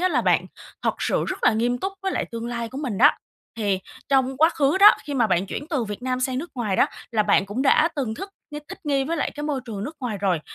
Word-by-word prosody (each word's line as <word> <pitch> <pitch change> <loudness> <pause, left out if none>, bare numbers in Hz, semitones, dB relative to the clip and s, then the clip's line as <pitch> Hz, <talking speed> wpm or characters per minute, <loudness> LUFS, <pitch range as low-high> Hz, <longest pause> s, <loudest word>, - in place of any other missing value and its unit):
á 370 - +3
là - - +1
bạn - - +2 0.4
thật - - +1
sự - - 0
rất - - -3
là - - +6
nghiêm 240 +3 0
túc 385 +8 -3
với 385 -1 -1
lại - - -1
tương 230 0 -4
lai 235 -1 -3
của 265 - -7
mình 250 -9 -3
đó. 290 +5 +8 0.5
Thì 200 -4 0 0.3
trong 265 -1 +2
quá 320 +3 +5
khứ 290 +2 +1
đó, 410 +2 +10
khi 290 - -4
mà 240 -4 +3
bạn 185 -1 +1
chuyển 290 - -5
từ 275 -7 0
Việt 210 +2 -6
Nam 255 0 -1
sang 255 0 0
nước 340 +5 -6
ngoài 220 -7 -1
đó - - +5 0.3
là 215 - +3
bạn 200 -1 +3
cũng 215 +7 -2
đã 305 +3 +4
từng 250 -6 -2
thức 390 - -7 0.4
thích 385 - -8
nghi 275 -2 +1
với 330 +4 -2
lại - - -1
cái 295 - -6
môi 290 -3 -1
trường 210 -4 -5
nước 305 +5 -7
ngoài 230 -6 -3
rồi, 185 -4 +1
255 Hz, 275 wpm, -24 LUFS, 220-290 Hz, 0.5 s, đó